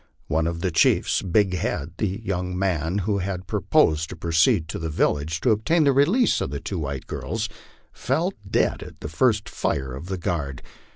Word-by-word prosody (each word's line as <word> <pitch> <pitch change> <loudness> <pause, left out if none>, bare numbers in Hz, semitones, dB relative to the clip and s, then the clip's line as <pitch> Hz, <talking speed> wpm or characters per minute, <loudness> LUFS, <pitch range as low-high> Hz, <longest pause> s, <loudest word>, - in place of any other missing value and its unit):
One 80 +1 0
of 85 0 -3
the 95 -1 0
chiefs, - - +3
Big 95 +1 +2
Head, 85 -3 -2
the 105 - +1 0.2
young 90 0 -2
man 90 -2 0
who 100 -1 +1
had 95 -1 -3
proposed 80 +1 +2
to - - -7
proceed 85 +3 +2
to - - -4
the 80 0 -3
village 75 +1 0
and 125 - +4
obtain 155 +10 +2
the 140 -2 +4
release 180 - +3
of - - -1
the 70 +1 -4
two 95 +3 -4
white 70 -3 -4
girls, - - -3 0.5
fell - - 0 0.2
dead - - +1
at - - -11
the 75 - -5
first 110 +5 +2
fire 65 -2 -2
of 70 +7 -7
the 95 0 -3
guard. 75 -6 -3
90 Hz, 190 wpm, -24 LUFS, 80-100 Hz, 0.5 s, and